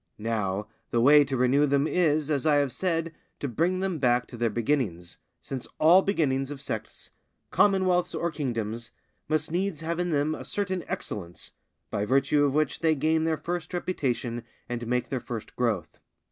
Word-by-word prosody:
Now 105 -2 -1 0.2
the 120 - +1
way 145 +5 +7
to 135 -1 -2
renew 130 +4 +3
them 140 +1 +2
is, 155 -3 +1
as 145 0 0
I 150 - +5
have 140 -2 +2
said, 165 0 -1 0.3
to 145 - -2
bring 170 +9 0
them 190 -4 -1
back 125 -2 +3
to - - -9
their 120 0 +1
beginnings, 110 - -1 0.2
since 130 -2 -6
all 170 +5 +7
beginnings 140 -9 0
of 145 -2 -6
sects, 110 -5 -6 0.4
commonwealths, 185 -3 +3
or 170 0 -1
kingdoms 115 -6 -3 0.4
must 155 0 0
needs 180 -2 -1
have 165 +1 -2
in 180 0 0
them 150 0 +1
a - - -6
certain 185 -3 -2
excellence, 90 -4 -5 0.4
by 100 - -1
virtue 140 +4 +3
of 140 -1 0
which 155 -2 +1
they 160 -1 +3
gain 160 +2 +1
their 160 -1 +1
first 175 +1 -4
reputation 125 -9 -2 0.3
and 120 -1 -4
make 125 0 0
their 130 - -1
first 115 -2 -7
growth. 110 -10 -1
145 Hz, 175 wpm, -27 LUFS, 120-165 Hz, 0.4 s, way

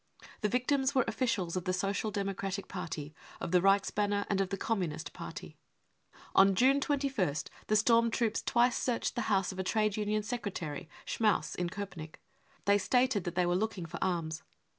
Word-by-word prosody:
The 210 - 0
victims 265 +3 +1
were 260 - +4
officials 215 -8 -1
of 185 - -2
the 185 - 0
Social 200 +3 -1
Democratic 195 -1 -3
Party, 160 -5 -5 0.3
of - - -4
the 180 -1 +5
Reichsbanner 200 +1 +2
and 195 -1 +2
of 190 - -1
the 195 - -2
Communist 185 -10 -2
Party. - - -8 0.8
On 195 0 +6
June 265 +7 +5
21st 270 - 0 0.2
the 215 - +2
storm 230 +2 +4
troops 225 -1 0
twice 240 +1 +3
searched 245 -2 -1
the 235 -2 -2
house 195 -2 +2
of 190 - -8
a - - 0
trade 215 +1 +1
union 210 0 0
secretary, 185 -8 -4 0.2
Schmaus, 215 -2 +1
in 175 -1 -1
Kopenick. 175 -5 -7 0.5
They 200 0 +4
stated 245 -1 +2
that 175 -1 -3
they 180 0 +3
were 175 - +1
looking 200 -2 -1
for 170 +1 -5
arms. 165 -4 -1
200 Hz, 175 wpm, -32 LUFS, 180-225 Hz, 0.8 s, On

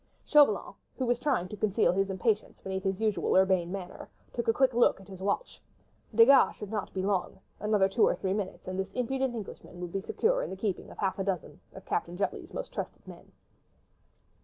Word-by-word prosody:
Chauvelin, 285 - +4 0.2
who 260 - -1
was 240 0 +1
trying 255 -12 0
to 210 - -6
conceal 210 +1 +2
his 195 +2 0
impatience 200 +3 -1
beneath 190 0 -4
his 195 -1 -1
usual 215 -2 +1
urbane 185 -2 +3
manner, 185 -2 -7 0.2
took 235 - -3
a - - +6
quick 260 +2 +2
look 240 -3 +4
at 195 - -15
his 190 -2 -10
watch. 205 - -2 0.5
Desgas 255 +4 +7
should 210 -1 -8
not 210 -3 -3
be 190 - -3
long: 195 -2 -1 0.2
another 210 -2 +3
two 195 +4 +3
or - - +2
three 190 -1 -1
minutes, 200 -3 -4
and 185 0 -3
this 190 - -2
impudent 260 0 -1
Englishman 195 -4 -8
would 175 -1 -5
be 195 - -1
secure - - +1
in - - -4
the - - -5
keeping 195 -2 -3
of - - -12
half 195 -1 -1
a - - +1
dozen 185 -5 -3 0.2
of - - -11
Captain 175 +1 -2
Jutley's 200 - -3
most - - -6
trusted - - -6
men. - - -12
200 Hz, 210 wpm, -29 LUFS, 190-235 Hz, 0.5 s, Desgas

